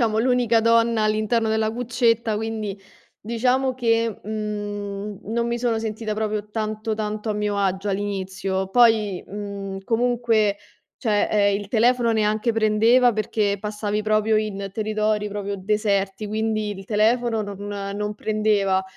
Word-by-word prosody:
diciamo, 220 -2 +2
l'unica 240 -1 +3
donna 230 0 +3
all'interno 215 +2 +1
della 220 0 +1
cuccetta, 235 -1 +1
quindi, 215 -2 -3 0.4
diciamo 250 +4 +1
che, 230 -3 +1
mhmm, 205 -1 -4
non 235 +1 0
mi 235 - -1
sono 235 -2 0
sentita 220 -1 -3
proprio 210 -1 -2
tanto, 215 0 -2
tanto 215 0 -3
a - - +1
mio 210 0 -1
agio 195 0 0
all'inizio, 195 -1 -2
poi, 220 -4 +4
mhmm, 200 -1 -6
comunque, 230 -2 +2 0.4
cioè, 210 -4 +1
uhm, 200 -1 +3
il 205 - -9
telefono 240 +1 +3
neanche 215 +1 +1
prendeva, 225 +3 +4
perché 210 -1 0
passavi 210 0 -2
proprio 215 +1 +2
in 200 -2 -2
territori 215 0 0
proprio 200 0 -4
deserti, 200 0 0
quindi, 215 0 -1
il 195 - -9
telefono 225 +2 +2
non 205 -1 -6 0.4
non 210 0 -3
prendeva. 210 -3 +1
215 Hz, 135 wpm, -23 LUFS, 205-225 Hz, 0.4 s, poi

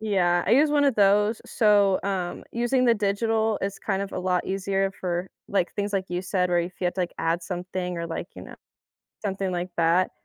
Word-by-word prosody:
Yeah, 180 -5 +2
I - - +1
use 290 +5 +5
one 290 -1 +3
of 275 -4 +3
those, 205 +2 +3
so, 205 -3 +3
um, 190 -3 -3
using 240 +2 +1
the 235 -2 +5
digital 220 +1 0
is 200 0 -3
kind 195 -1 -1
of 200 - -6
a - - -3
lot 180 -1 0
easier 195 0 0
for, 180 -1 -4 0.2
like, 190 -3 0
things 205 0 -2
like 190 -1 -1
you 175 0 -1
said, 185 -1 0
where 175 - +3
if 175 +2 -2
you - - -2
have 175 - -1
to, 190 - -2
like, 175 - -2
add 165 +2 0
something 180 0 -4
or, 170 - -3
like, 165 - -5
you - - -8
know, - - -11 0.7
something 195 -1 -1
like 180 +1 -3
that 170 +2 +3
195 Hz, 225 wpm, -25 LUFS, 180-205 Hz, 0.7 s, use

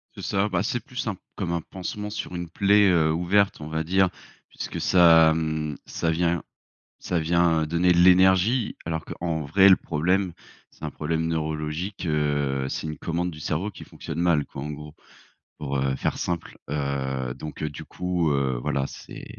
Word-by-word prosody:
C'est - - -8
ça, 100 +2 0
bah, 95 -2 0
c'est 120 +3 -1
plus 125 +3 -6
un 105 - -1
p 95 - -26
comme 90 -4 -3
un 85 -1 -1
pansement 100 +5 -6
sur 105 - -5
une 85 -1 -5
plaie, 100 +3 +4
heu, 80 -3 +3
ouverte, 90 +2 +2
on 75 - -6
va 80 0 -2
dire. 95 +3 +3 0.4
Puisque - - -6
ça, 80 -3 +6
mmh, 80 -2 -2
ça 80 - -1
vient 85 +1 0 0.6
ça 90 - -1
vient, 85 0 +2
heu, - - -3
donner 85 +3 +2
de - - +1
l'énergie. 95 +6 +4
Alors 80 0 -2
qu'en 85 -2 -3
vrai 95 +7 +5
le 95 - +8
problème, 90 +4 0 0.4
c'est - - -9
un - - -2
problème 80 +1 -2
neurologique, 80 +4 -3
heu, 75 -3 0
c'est 80 - -4
une 75 -1 -5
commande 85 +2 -2
du 75 - -10
cerveau 80 +7 -1
qui - - -11
fonctionne 80 - -7
mal 85 -4 +2
quoi 70 - -9
en 75 - -4
gros, 75 +1 -9 0.6
pour 70 -1 -3
heu, 65 0 +1
faire - - -1
simple. 85 -1 -3
Heu, 65 -3 -2
donc 75 +3 -8
heu, 75 - 0
du 70 - -9
coup 90 -3 -1
heu, 65 -3 0
voilà, 70 +1 0
c'est - - -10
80 Hz, 190 wpm, -25 LUFS, 75-90 Hz, 0.6 s, le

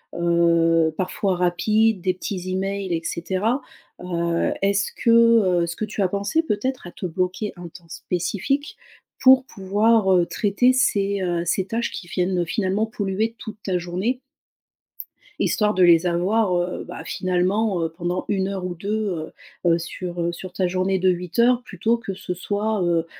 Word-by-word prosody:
heu 170 -1 +3
parfois 190 +1 -1
rapides. 205 +4 +2
Des 185 +1 +1
petits 185 0 -4
e-mails 195 0 -2
et 165 - -1
cetera, 190 +10 -1 0.4
heu, 170 -1 -1
est-ce 200 0 +1
que, - - -1
heu, 230 -7 +5
est-ce 170 0 -3
que 215 - -3
tu 210 0 -4
as 190 - +3
pensé 200 - 0
peut-être 255 - -2
à - - -9
te 185 - -7
bloquer 185 +4 -2
un 175 -1 -9
temps 170 0 -15
spécifique? 200 - -2 0.4
Pour 260 0 +7
pouvoir, 205 -1 +2
heu, 175 -2 +4
traiter 215 +7 +2
ces, 200 -6 +1
heu 175 -2 -1
ces 180 +3 0
tâches 230 +4 -2
qui 175 - -7
viennent, 180 0 -1
heu, 175 - +1
finalement 200 +3 0
polluer 220 0 -2
toute 220 -1 -8
ta 185 -2 0
journée? 185 +9 -2 1.2
Histoire 210 -2 +1
de 185 - +3
les 170 0 +6
avoir, 185 +3 +1
heu, 180 +1 -4
bah - - -8
finalement, 185 +1 0
heu, 165 - -1
pendant 175 +2 -3
1 190 -2 0
heure 195 -2 -4
ou 180 - -3
2 210 +4 -2
heu 160 -4 -4 0.3
heu, 170 -1 +4
sur, 175 +1 -5
heu 170 0 0
sur 180 +1 -9
ta 185 0 0
journée 185 +2 0
de 185 +1 +3
8 180 +3 -2
heures. 245 +1 +4
Plutôt 220 +3 0
que 215 -4 -6
ce 180 -1 -5
soit, 205 +3 -2
heu 170 -1 +1
185 Hz, 175 wpm, -23 LUFS, 175-215 Hz, 1.2 s, Pour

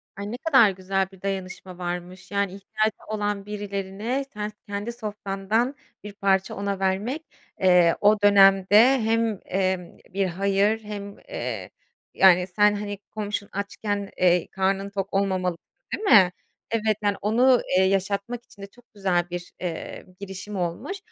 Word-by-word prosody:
Ay, 200 +2 -6
ne 245 - -4
kadar 270 -7 +5
güzel 190 0 -1
bir 190 -1 -17
dayanışma 185 -2 -5
varmış. 180 +1 -6
Yani, 200 -2 0
ihtiyacı 215 +2 -2
olan 205 -2 -2
birilerine 205 +5 -3
sen 210 0 -4 0.2
kendi 205 +3 -4
sofrandan 210 +2 -2 0.3
bir 210 - -8
parça 195 -1 +1
ona 200 -1 -2
vermek, 205 +11 -1 0.4
eee, 180 -3 +5
o 210 0 +4
dönemde 205 +5 +6
hem, 225 -2 +1
emm, 185 -2 -1 0.2
bir 195 0 +1
hayır 200 +4 +1
hem, 200 -1 -7
eee, - - -5 0.4
yani, 180 -1 +5
sen, 205 +3 +3
hani, 205 0 -4 0.2
"Komşusu 205 -1 -3
açken, 200 0 -3
eee, 180 -1 +3
karnın 195 +1 0
tok 195 0 -4
olmamalısın." 185 -3 0 0.3
değil - - -3
mi? 190 - +6 0.4
Evet, 220 -2 +1
yani, 205 -1 +1
onu, 245 +5 +4 0.2
eee, 190 - +5
yaşatmak 200 +5 -1
için 200 - -17
de 200 - -7
çok 240 +3 -24
güzel 180 -4 0
bir, 175 0 -6
eee, 175 -3 -5
girişim 200 +1 -7
olmuş 180 - -3
200 Hz, 145 wpm, -25 LUFS, 190-210 Hz, 0.4 s, dönemde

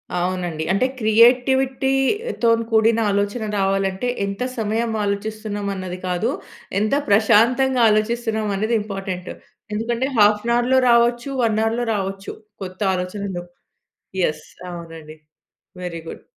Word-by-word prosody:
అవునండి. 175 -3 -2
అంటే 200 +6 +2
క్రియేటివిటీతోని 260 - +2
కూడిన 225 +1 +4
ఆలోచన 205 +3 -1
రావాలంటే 195 +3 0 0.2
ఎంత 200 +2 -5 0.2
సమయం 225 +1 -1
ఆలోచిస్తున్నాం 205 0 -3
అన్నది 185 -1 -5
కాదు. 180 -1 0 0.5
ఎంత 215 +5 0 0.2
ప్రశాంతంగా 235 +5 +4
ఆలోచిస్తున్నాం 220 0 0
అనేది 220 +4 0
ఇంపార్టెంట్. 195 -3 -5 0.5
ఎందుకంటే 235 +4 -1
హాఫ్ 210 0 +5
అన్ 235 - +2
అవర్‌లో 250 +2 +3
రావచ్చు. 240 +2 +3
1 220 -1 +1
అవర్‌లో 230 +2 0
రావచ్చు 195 0 -4 0.3
కొత్త 185 0 -8
ఆలోచనలు. 180 0 -4 0.8
యెస్. 155 -2 -1 0.3
అవునండి. 165 -3 -9 0.7
Very 170 -2 -5
good. - - -8
215 Hz, 110 wpm, -21 LUFS, 195-235 Hz, 0.8 s, హాఫ్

